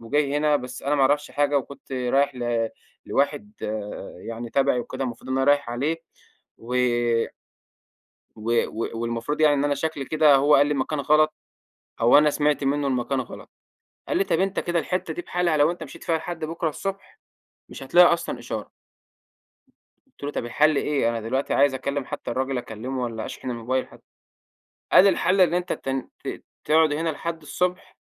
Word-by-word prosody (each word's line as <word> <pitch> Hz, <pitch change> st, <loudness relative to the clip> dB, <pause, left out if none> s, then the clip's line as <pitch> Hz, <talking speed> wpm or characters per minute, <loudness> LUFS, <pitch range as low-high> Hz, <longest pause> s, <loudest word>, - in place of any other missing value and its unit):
وجاي 140 Hz, +4 st, 0 dB
هنا 150 Hz, 0 st, +3 dB
بس 125 Hz, -1 st, -7 dB
أنا 145 Hz, +2 st, +1 dB
ما 140 Hz, -, +1 dB
اعرفش 145 Hz, +2 st, +2 dB
حاجة 145 Hz, 0 st, +2 dB
وكنت 140 Hz, 0 st, -10 dB
رايح 130 Hz, +2 st, +1 dB
ل 120 Hz, -2 st, -1 dB, 0.4 s
لواحد 210 Hz, +10 st, 0 dB
آآ، 105 Hz, -2 st, -5 dB
يعني 115 Hz, +3 st, -7 dB
تبعي 135 Hz, -2 st, +2 dB
وكده 135 Hz, -, -5 dB
المفروض 120 Hz, +1 st, -6 dB
إن 130 Hz, -, 0 dB
أنا 135 Hz, -, +2 dB
رايح 145 Hz, -3 st, +3 dB
عليه 145 Hz, +7 st, -1 dB, 0.6 s
و 120 Hz, +2 st, -6 dB, 1.6 s
و 110 Hz, +2 st, -4 dB, 0.2 s
و 115 Hz, -, -4 dB
والمفروض 115 Hz, +6 st, -2 dB
يعني 150 Hz, -2 st, +5 dB
إن 140 Hz, -, 0 dB
أنا 145 Hz, -1 st, +2 dB
شكلي 145 Hz, -1 st, -3 dB
كده 155 Hz, -1 st, +4 dB
هو 145 Hz, +2 st, +4 dB
قال 145 Hz, -, +6 dB
لي 150 Hz, -, 0 dB
المكان 145 Hz, +1 st, -1 dB
غلط، 155 Hz, +2 st, +3 dB, 0.7 s
أو 120 Hz, +4 st, +7 dB
أنا 150 Hz, 0 st, +5 dB
سمعت 145 Hz, -1 st, +1 dB
منه 140 Hz, +1 st, +1 dB
المكان 130 Hz, +1 st, 0 dB
غلط، 125 Hz, -, -10 dB, 0.6 s
قال -, -, 0 dB
لي: 395 Hz, -, +2 dB
"طيب -, -, 0 dB
أنت 195 Hz, 0 st, 0 dB
كده 175 Hz, 0 st, -1 dB
الحتة 180 Hz, +2 st, -2 dB
دي 350 Hz, -, -5 dB
بحالها 175 Hz, -, 0 dB
لو 150 Hz, +3 st, +4 dB
أنت 175 Hz, -2 st, -6 dB
مشيت 145 Hz, -, -10 dB
فيها 165 Hz, -1 st, +1 dB
لحد 165 Hz, -1 st, -5 dB
بُكرة 165 Hz, +1 st, -2 dB
الصبح 195 Hz, +5 st, -6 dB, 0.5 s
مش -, -, -10 dB
هتلاقي 175 Hz, +6 st, +6 dB
أصلًا 170 Hz, 0 st, -4 dB
إشارة." -, -, -6 dB, 1.5 s
قلت -, -, -22 dB
له: 145 Hz, -, -2 dB
"طب 145 Hz, -, -3 dB
الحل 150 Hz, +5 st, +3 dB
إيه؟ 140 Hz, -6 st, +1 dB
أنا 115 Hz, -1 st, -1 dB
دلوقتي 130 Hz, +5 st, -1 dB
عايز 140 Hz, -1 st, +4 dB
أكلم 140 Hz, +1 st, -2 dB
حتى -, -, -6 dB
الراجل 130 Hz, 0 st, -1 dB
أكلمه، 125 Hz, +3 st, -5 dB
والّا 115 Hz, -2 st, -4 dB
أشحن 130 Hz, -, -6 dB
الموبايل 125 Hz, +2 st, -2 dB
حتى." -, -, -17 dB, 0.9 s
قال: 195 Hz, -, +8 dB
"الحل 185 Hz, +1 st, +3 dB
إن 175 Hz, -2 st, +4 dB
أنت 180 Hz, 0 st, 0 dB
ت -, -, -6 dB, 0.4 s
ت -, -, -5 dB, 0.2 s
تقعد 155 Hz, -1 st, +4 dB
هنا 160 Hz, +2 st, -1 dB
لحد 165 Hz, +2 st, -4 dB
الصبح، 180 Hz, +4 st, -2 dB
145 Hz, 180 wpm, -24 LUFS, 125-155 Hz, 1.6 s, قال